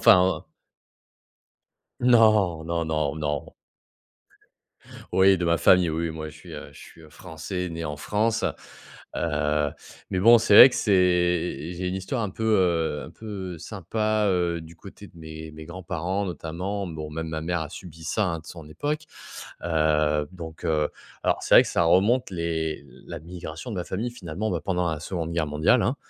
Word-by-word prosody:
Enfin, 95 0 +5
heu - - -20 1.6
Non, 110 -9 +4
non, 85 0 -1
non, 75 -3 0
non. 75 -1 -3 1.6
Oui, 95 0 +5
de 90 - 0
ma 85 0 +3
famille. 90 +2 +5
Oui, 80 +1 -2
moi, 80 -1 -6
je 75 - -14
suis, - - -12
heu, - - -8
je - - -16
suis, - - -14
heu, 80 - -15
français, 90 +2 -6
né 85 0 -5
en 75 -2 -4
France. 110 +7 0 0.7
Heu, 75 0 0 0.4
mais 95 - 0
bon, 115 +5 +8
c'est 110 - +2
vrai 130 - +12
que - - -5
c'est 90 -5 +1
j'ai 90 +1 -3
une 90 - -2
histoire 95 +6 -3
un 105 - -2
peu, 110 - -6
heu, 85 -8 +2
un - - -11
peu 95 -4 -7
sympa, 105 +4 -1
heu, 85 -2 0
du 80 +1 -13
côté 100 +4 -12
de 85 - -19
mes 80 -1 -9
de - - -15
mes 80 0 -9
grands-parents, 90 +2 -3
notamment. 90 +4 -4
Bon, 80 -2 -6
même 80 +1 -4
ma 80 0 -3
mère 85 +1 -1
a 80 - -5
subi 80 -3 -11
ça, 100 +6 0
hein, 85 -3 -2
de 80 - -17
son 80 -3 -10
époque. 145 - -3 0.6
Heu, 75 -2 +2
donc, 80 -3 -9
heu, 75 -2 +1 0.3
alors - - +2
c'est - - +3
vrai - - +10
que - - -5
ça - - +1
remonte 100 +8 +3
les 80 -3 -2
l - - -18
la 85 - -6
migration 85 +4 -8
de 105 - -4
ma 90 - -2
famille, 110 +6 -3
finalement, 100 -1 -4
bah, - - -1
pendant 90 -3 0
la 80 -2 -4
2de 85 -1 -4
guerre 80 -2 0
mondiale, 75 +1 +3
hein. - - 0
85 Hz, 190 wpm, -25 LUFS, 80-95 Hz, 1.6 s, vrai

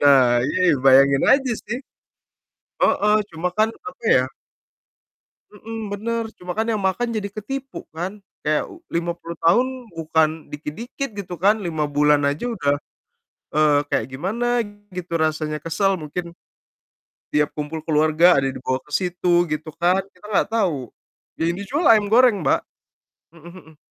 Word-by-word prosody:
Nah, 130 -4 +5
iya 155 - -1 0.3
bayangin 135 +1 +6
aja 265 -2 +2
sih. 240 +4 -3 1.0
Heeh, 210 +1 +3 0.2
cuma 170 +3 -1
kan, 215 - +5 0.2
apa 475 - -14
ya - - +4 1.3
Mhm, 225 +2 -8 0.2
bener, 230 +3 -2
cuma 180 0 -5
kan 220 - +1
yang 210 - -1
makan 190 +6 0
jadi 205 -1 -2
ketipu 270 +6 -5 0.2
kan, 175 +4 -3 0.3
kayak 150 0 +1
u 335 - -14
50 170 0 -3
tahun 235 +10 +5 0.3
bukan 160 -1 +2 0.2
dikit-dikit 225 - -5
gitu 180 -3 -5
kan, 205 +6 +3
5 160 -5 -2
bulan 150 0 +4
aja 145 +9 -3
udah, 145 -8 +1 0.8
eee, 150 -1 +4
kayak 110 - 0
gimana 195 - -2 0.5
gitu 180 -2 -6
rasanya 155 -1 -1
kesel 190 +4 +1
mungkin, 165 +2 -5 1.1
tiap 150 0 +2
kumpul 150 +1 -4
keluarga 155 +3 +4
ada 140 - +2
yang - - -8
dibawa 130 +1 -1
ke 150 - -21
situ, 175 0 +1
gitu 155 +1 -4
kan, 180 +3 +3
kita 185 +3 -18
nggak - - +3
tahu, 170 - -1 0.5
yang 170 +1 +1
dijual 260 - -2
ayam 215 -2 +6
goreng, 230 -6 +5
Mbak, - - +3 0.8
mhm 165 +1 -12
mhm. 160 -4 -15
175 Hz, 145 wpm, -22 LUFS, 150-210 Hz, 1.3 s, bayangin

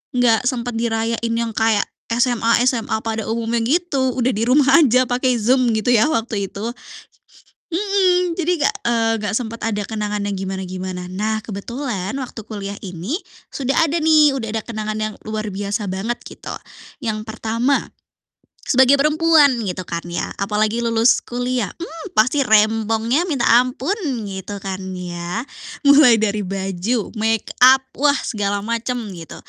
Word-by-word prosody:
gak 245 -1 +3
sempat 245 -2 -2
dirayain 230 0 -1
yang 230 0 -1
kayak 220 -2 +3 0.3
SMA-SMA 235 0 +2
pada 225 -1 -3
umumnya 230 +1 -1
gitu, 275 -3 +1
udah, 250 0 +1
di 220 -1 -2
rumah 270 +2 +5
aja 255 -4 +4
pakai 250 0 +1
Zoom, 250 +1 +3
gitu 220 +2 0
ya, 230 -2 +5
waktu 225 -8 -1
itu. 210 +3 -4 1.0
Mhm, 365 -2 +2
jadi 355 -1 0
gak, - - +1
eee, 225 -1 +2
gak 205 -1 -2
sempet 230 -2 -5
ada 210 -2 -1
kenangan 210 -2 -3
yang 205 - -2
gimana-gimana. 185 -1 -5
Nah, 215 +4 -2
kebetulan 210 -1 -4
waktu 245 -3 -7
kuliah 200 -1 -5
ini 185 - -4 0.4
sudah 270 0 -1
ada 325 - 0
nih, 310 -2 +5
udah 235 - -4
ada - - -2
kenangan 215 -2 -4
yang 215 0 -2
luar 215 -1 -3
biasa 205 +2 -3
banget 200 +6 -2
gitu, - - -8 0.5
yang 215 -2 -2
pertama 230 +5 -1 0.8
sebagai 265 +1 +5
perempuan, 305 -3 +4
gitu 185 -1 -4
kan 170 0 -3
ya, 175 - -2
apalagi 215 +3 0
lulus 230 +2 +4
kuliah, 245 -3 -2
mmm, 335 +2 -8
pasti 260 +6 +3
rempongnya 225 +5 +2
minta 265 -5 0
ampun, 255 - 0 0.3
gitu 195 +1 -6
kan, 190 -1 -4
ya. 175 +2 -4 0.5
Mulai 280 -5 +7
dari 210 -1 0
baju, 195 +4 -2
makeup, 225 +4 +4 0.2
wah, 285 +1 +3
segala 205 -2 -1
macam 230 +3 -2 0.2
gitu, 165 -1 -9
230 Hz, 145 wpm, -20 LUFS, 210-255 Hz, 1.0 s, Mulai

